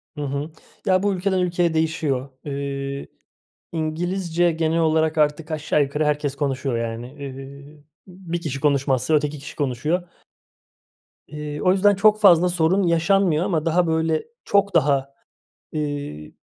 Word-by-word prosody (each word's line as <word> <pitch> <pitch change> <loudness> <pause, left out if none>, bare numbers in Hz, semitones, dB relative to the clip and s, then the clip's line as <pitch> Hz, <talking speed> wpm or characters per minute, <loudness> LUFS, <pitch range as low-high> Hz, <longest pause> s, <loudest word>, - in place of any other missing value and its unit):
Hı 150 - -5
hı. 140 +2 -3 0.3
Ya, 185 -1 +3
bu 205 -1 +2
ülkeden 190 0 0
ülkeye 175 -2 +1
değişiyor. 155 -4 -1 0.2
Eee, 140 -1 -4 0.6
İngilizce 170 +2 0
genel 160 0 0
olarak 160 0 +2
artık 150 +1 +1
aşağı 150 -1 +1
yukarı 150 +2 -1
herkes 145 -2 0
konuşuyor 135 -3 -1
yani. 115 +1 -4
Eee, 140 +2 -10 0.2
bir 175 -2 -6
kişi 140 -4 -4
konuşmazsa 140 0 +1
öteki 150 0 -1
kişi 140 - -10
konuşuyor. 150 +6 -1 1.2
Eee, 150 0 -6
o 185 - +4
yüzden 200 +2 +4
çok 210 +2 +4
fazla 180 -3 +6
sorun 175 +3 +2
yaşanmıyor 170 0 +2
ama 165 -6 -1
daha, 170 +1 +2
böyle, 160 -1 +1 0.2
çok 200 -1 +2
daha, 140 -3 +2 0.6
eee 145 - -4
155 Hz, 135 wpm, -22 LUFS, 140-175 Hz, 1.2 s, fazla